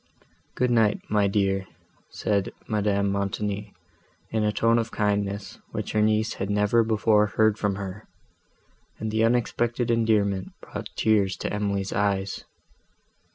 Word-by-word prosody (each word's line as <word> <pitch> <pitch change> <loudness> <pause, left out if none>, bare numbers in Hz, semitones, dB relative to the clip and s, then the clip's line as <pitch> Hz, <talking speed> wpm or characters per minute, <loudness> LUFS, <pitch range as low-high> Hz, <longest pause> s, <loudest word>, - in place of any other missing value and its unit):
"Good 125 0 +1
night, 110 -3 +3
my 105 -1 +3
dear," 95 -1 0 0.4
said 100 -2 -1 0.2
Madame 100 -2 +1
Montoni, 100 +1 -2 0.6
in 110 -1 0
a 105 - +2
tone 115 +2 +3
of 115 0 -2
kindness, 100 -1 -1
which - - -3
her 105 - +2
niece 110 +1 +2
had 100 - -1
never 105 +3 +3
before 110 -1 +3
heard 110 0 +2
from 100 -2 0
her; 100 +1 -7 0.9
and 110 0 -3
the 110 +1 +2
unexpected 120 0 +1
endearment 105 -4 +1
brought - - -7
tears 100 -4 +2
to - - -3
Emily's 100 -2 -1
eyes. 100 -1 -1
105 Hz, 135 wpm, -25 LUFS, 100-110 Hz, 0.9 s, night